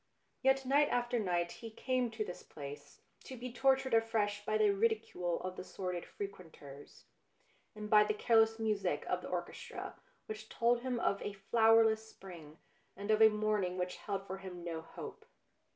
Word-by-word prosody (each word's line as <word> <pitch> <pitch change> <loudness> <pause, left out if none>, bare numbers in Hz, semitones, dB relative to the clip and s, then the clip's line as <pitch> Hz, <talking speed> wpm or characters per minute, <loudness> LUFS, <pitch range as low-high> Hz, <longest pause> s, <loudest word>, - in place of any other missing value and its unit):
Yet 265 0 +3
night 285 +3 +4
after 240 0 0
night 175 -4 0
he 230 - -8
came 250 +2 -1
to 220 -1 -3
this 180 - -7
place, 145 0 -10 0.2
to 260 - -8
be 245 0 -6
tortured 265 -1 +2
afresh 220 -2 +1
by 215 +1 +1
the 215 -1 +4
ridicule 200 -5 0
of 185 0 -5
the - - -5
sordid 180 -2 -5
frequenters, 160 -8 -9 0.7
and 210 0 -6
by 210 -1 +6
the 210 - 0
careless 225 0 +4
music 215 -3 0
of - - 0
the - - -7
orchestra 475 0 -5 0.2
which 215 0 -7
told 235 +1 +2
him 250 -1 -2
of 200 -3 0
a 205 - -4
flowerless 220 +2 +4
spring 165 -5 -12 0.4
and 205 +2 -2
of 215 0 +3
a 220 - +10
morning 210 -4 0
which 180 0 -2
held 195 -2 -4
for 190 0 -6
him 180 -2 -8
no 165 -2 -4
hope. 165 - -9
215 Hz, 170 wpm, -34 LUFS, 185-230 Hz, 0.7 s, a